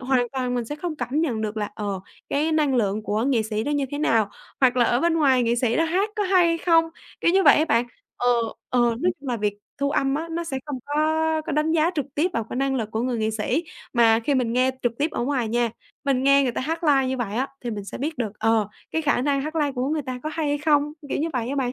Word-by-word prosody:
hoàn 255 -2 +1
toàn 255 -2 -1
mình 245 -1 -1
sẽ 295 +6 -6
không 315 0 -4
cảm 255 +3 -1
nhận 255 -9 -1
được 215 0 -3
là, 210 -1 -2
ờ, 200 -3 -3 0.3
cái 305 +3 0
năng 300 -4 +2
lượng 215 -3 +1
của 210 +1 -1
nghệ 255 -4 +2
sĩ 215 0 -2
nó 290 - -2
như 290 -1 +1
thế 285 - -4
nào, 225 -8 +2 0.3
hoặc 255 -1 +4
là 245 - +4
ở 240 +1 +2
bên 340 +1 +2
ngoài 270 -6 +4
nghệ 235 0 +2
sĩ 240 -1 +1
nó 330 - +3
hát 375 +6 0
có 420 - +1
hay 370 -3 +4
hay 335 0 +1
không, 330 -1 +4 0.4
kiểu - - +3
như 385 +1 +4
vậy - - +7
á 310 - +3
bạn. 235 -5 +2 0.3
Ờ, 245 - 0 0.4
ờ, 250 - +1
nói 240 +9 +2
chung 275 - -7
là 245 - 0
việc 205 -1 -2 0.2
thu 280 0 0
âm 275 -1 +1
á 320 +3 -3
nó 340 +1 -3
sẽ 270 -5 -3
không 285 -3 -4
có 290 - -4 0.5
có - - -2
đánh 305 +2 +1
giá 325 +1 +3
trực 290 -5 -1
tiếp 335 +5 +1
vào 230 - -1
cái - - -5
năng 270 +1 0
lực 225 -5 -2
của 220 - -2
người 245 -1 -1
nghệ 220 0 0
sĩ, 220 +10 -1 0.3
mà 230 -2 +4
khi 285 - +2
mình 245 -3 +1
nghe 255 +2 +3
trực 240 - +1
tiếp 300 +3 +1
ở - - -2
ngoài 255 -4 0
nha, 235 +1 +1 0.3
mình 270 -2 +1
nghe 275 +1 +5
người 255 -3 0
ta - - -3
hát 325 +5 -3
live 275 -4 +4
như 260 - -1
vậy 220 -4 -3
á 260 +3 0 0.2
thì 240 - -2
mình 205 -3 -5
sẽ - - -7
biết 305 +4 -3
được, 220 -5 -2
ờ, 225 -2 +2 0.2
cái 320 - -1
khả 285 -4 +1
năng 280 0 +1
hát 310 +3 -4
live 295 -3 +1
của 255 +1 -2
người 305 0 -1
ta 255 -1 -5
có 310 - -3
hay 310 -1 -1
hay 290 0 0
không, 295 0 +2 0.2
kiểu - - -1
như 320 - 0
vậy 245 -3 -2
á 280 - -2
bạn. 255 -3 0
265 Hz, 290 wpm, -24 LUFS, 235-300 Hz, 0.5 s, vậy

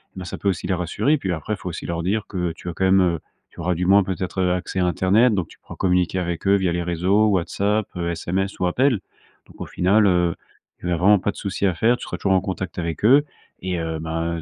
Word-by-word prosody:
bah 95 -1 -7
ça - - -6
peut 100 - 0
aussi 90 -3 -2
les 95 - +1
rassurer. 90 - 0
Puis 95 -9 -3
après, 85 +6 -3
il - - -15
faut 90 - -6
aussi 85 - -6
leur 85 0 -3
dire 105 +4 -1
que 90 -4 -2
tu 90 - -7
as - - -4
quand 95 - -1
même, 95 0 +5
heu, 85 -3 +1 0.3
tu - - -16
auras 90 - 0
du 90 +1 -2
moins, 100 +1 +6
peut-être 95 0 -3
accès 90 +1 -1
à 90 - +2
Internet, 100 +7 +3
donc 95 -5 -1
tu - - -17
pourras - - -11
communiquer 90 0 +1
avec 85 -1 -3
eux, 100 - +5
via 95 -3 +1
les 85 0 -1
réseaux 90 +5 +2
WhatsApp, 100 +2 0
SMS 85 +3 -2
ou 90 - +1
appels. 125 +5 +2 0.5
Donc - - -18
au - - -4
final, 100 +4 +2
heu, 90 -2 +2 0.4
tu 90 - -4
as - - +2
vraiment 100 +4 +5
pas 100 - -1
de - - -21
souci 100 0 -3
à 95 - +2
faire, 115 +8 +2
tu - - -10
seras - - -5
toujours 95 - +1
en - - +1
contact 95 -2 -5
avec 85 -1 -4
eux 135 +7 +6 0.4
et 90 -1 -2
heu, 80 -1 -3
ben, 80 +1 -3
90 Hz, 260 wpm, -22 LUFS, 85-100 Hz, 0.5 s, moins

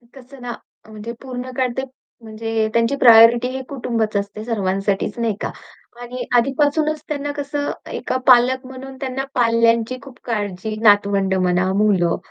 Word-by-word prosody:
कसं 265 0 -14
ना 245 0 -5 0.3
अ, - - -17
म्हणजे 215 +1 -7
पूर्ण 255 -1 -6
काळ 260 -1 +2
ते 265 - -1 0.4
म्हणजे 220 0 -2
त्यांची 230 +4 +2
प्रायोरिटी 235 -1 +7
हे 265 0 -4
कुटुंबच 235 -5 -2
असते 200 +2 -4
सर्वांसाठीच 195 -2 -1
नाही 230 -3 0
का - - -3 0.5
आणि 245 +1 -6
आधीपासूनच 295 +5 +1
त्यांना 290 -1 -3
कसं 285 0 -3 0.2
एका - - -2
पालक 255 +1 +5
म्हणून 265 +1 -10
त्यांना 265 0 -3
पाल्यांची 230 0 +2
खूप 270 -3 -13
काळजी, 210 -2 -3
नातवंड 200 -2 +3
म्हणा, 185 0 +1
मुलं, 195 -4 +2
235 Hz, 145 wpm, -20 LUFS, 215-260 Hz, 0.5 s, प्रायोरिटी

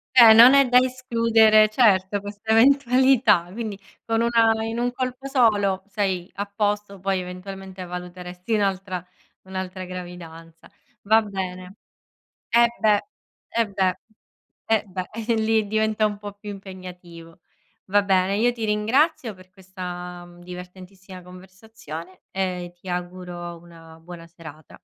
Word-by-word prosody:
Eh. 230 -3 +10
Non 240 +4 +9
è 275 -2 +5
da 250 - +6
escludere, 230 -4 +4
certo, 205 -4 +2
questa 205 +2 -5
eventualità. 255 -6 +4
Quindi 215 -2 -5 0.3
con 225 0 0
una 225 -1 +3
in 225 +1 -4
un 245 +1 0
colpo 255 +1 -4
solo, 205 -8 +2
sei 190 -3 -2
a 200 - -3
posto, 205 -1 -2
poi 190 0 -1
eventualmente 190 +1 -8
valuteresti 180 +3 -7
un'altra 195 -3 -1 0.4
un'altra 185 0 -6
gravidanza. 170 -2 -10 0.3
Va 220 +2 +4
bene 190 -2 -6 0.7
Eh, 235 0 +5
beh! 210 -2 +4 0.5
Eh, 230 -1 0
beh! 190 -2 0 0.8
Eh, 220 -1 +3
beh, 185 -1 -6
e 230 +1 -2
lì 220 -1 +1
diventa 215 0 0
un 205 -1 -4
po' 205 -1 -8
più 205 0 -9
impegnativo. 180 -4 -11 0.5
Va 205 +1 +3
bene, 195 0 +2
io 240 +3 +2
ti 230 -2 -5
ringrazio 245 +5 +1
per 185 0 -18
questa 180 -2 -8
divertentissima 180 +1 -11
conversazione 185 -1 -11
e 180 -2 -3
ti 185 - -13
auguro 175 -1 -6
una 165 -1 -15
buona 170 -1 -11
serata. 160 -3 -13
195 Hz, 130 wpm, -23 LUFS, 180-220 Hz, 0.8 s, Eh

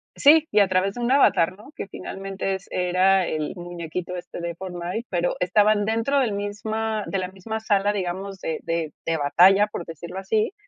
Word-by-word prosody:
sí. 315 +2 +6
Y 210 - +4
a 200 - +5
través 185 +1 +1
de 245 - -5
un 240 +2 0
avatar, 185 -10 +4
¿no? 215 +7 -14
Que - - -6
finalmente 195 0 -4
es 190 - -10
era 185 +1 +3
el 155 -1 -2
muñequito 175 0 -6
este 175 - -8
de 170 -1 -4
Fortnite, 180 +4 -5
pero 175 -1 0
estaban 205 +3 +3
dentro 230 +6 +1
del 240 -6 +1
misma 215 +1 -2
de 195 - -2
la 185 -1 -3
misma 205 +4 -5
sala, 205 -1 +2
digamos, 190 +1 -4
de 160 - -3
de 165 -2 -2
de 165 0 0
batalla, 190 +8 +5
por 175 - -6
decirlo 170 +3 -7
así. 215 - 0
195 Hz, 190 wpm, -24 LUFS, 175-210 Hz, -, sí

